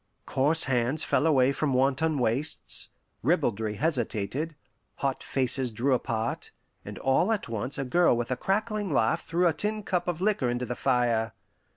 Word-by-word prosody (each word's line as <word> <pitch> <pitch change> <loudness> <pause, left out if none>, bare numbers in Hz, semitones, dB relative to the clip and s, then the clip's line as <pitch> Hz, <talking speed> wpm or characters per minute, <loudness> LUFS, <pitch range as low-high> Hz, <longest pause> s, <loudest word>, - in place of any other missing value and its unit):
Coarse 150 +5 +2
hands 130 +3 +1
fell 160 - +2
away 135 -4 +4
from 140 -1 -1
wanton 140 +4 +2
waists; 130 +5 -1 0.3
ribaldry 115 - 0
hesitated; 140 +2 -2 0.4
hot 135 -1 -2
faces 130 -1 +1
drew 120 +5 0
apart; 115 -2 -2 0.3
and - - -8
all 135 +10 +2
at 220 - -1
once 115 +3 -3
a 135 - -2
girl 170 -1 +3
with 120 +1 -3
a - - +2
crackling 210 - -1
laugh 115 -5 +2
threw 175 +2 0
a 165 - +2
tin 210 +4 -2
cup 180 -3 -1
of 175 -2 -2
liquor 190 -10 +1
into 120 +1 -2
the 125 - -4
fire. 120 -4 +1
135 Hz, 165 wpm, -27 LUFS, 120-165 Hz, 0.4 s, away